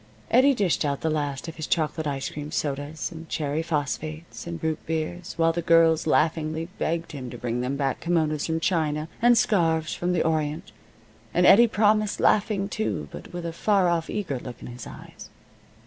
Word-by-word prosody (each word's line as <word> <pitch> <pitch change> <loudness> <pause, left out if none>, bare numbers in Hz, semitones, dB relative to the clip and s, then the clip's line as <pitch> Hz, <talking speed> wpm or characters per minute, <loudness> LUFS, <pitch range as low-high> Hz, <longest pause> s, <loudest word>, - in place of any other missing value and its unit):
Eddie 265 +3 +5
dished 195 -8 +1
out 140 -2 -1
the 160 - 0
last 145 -1 -2
of 165 - -8
his 155 - -4
chocolate 155 -1 0
ice 135 -2 -3
cream 150 0 -6
sodas 145 +2 -3
and 165 -1 -10
cherry 150 0 -1
phosphates 155 +1 -4
and 170 -1 -4
root 160 -1 -1
beers, 165 +2 -3
while 165 0 +3
the 170 - -2
girls 165 -1 +4
laughingly 160 +1 +1
begged 165 +1 -1
him 130 -5 -6
to 120 - -8
bring 120 0 -2
them 130 +3 -2
back 135 -2 -1
kimonos 155 -3 0
from 160 0 0
China, 155 -3 0
and 240 0 +6
scarves 165 -8 +2
from 175 +1 -1
the 175 - +2
Orient, 160 +3 -1 0.6
and 180 +1 +4
Eddie 235 +6 +8
promised, 215 -1 +2
laughing, 200 -1 +2
too, 200 - -3
but 75 - -10
with 175 -1 -6
a 165 - -3
far 195 0 +2
off, 165 -1 0
eager 170 -11 -3
look 120 0 -9
in - - -10
his 120 -1 -8
eyes. - - -11
160 Hz, 190 wpm, -25 LUFS, 150-175 Hz, 0.6 s, Eddie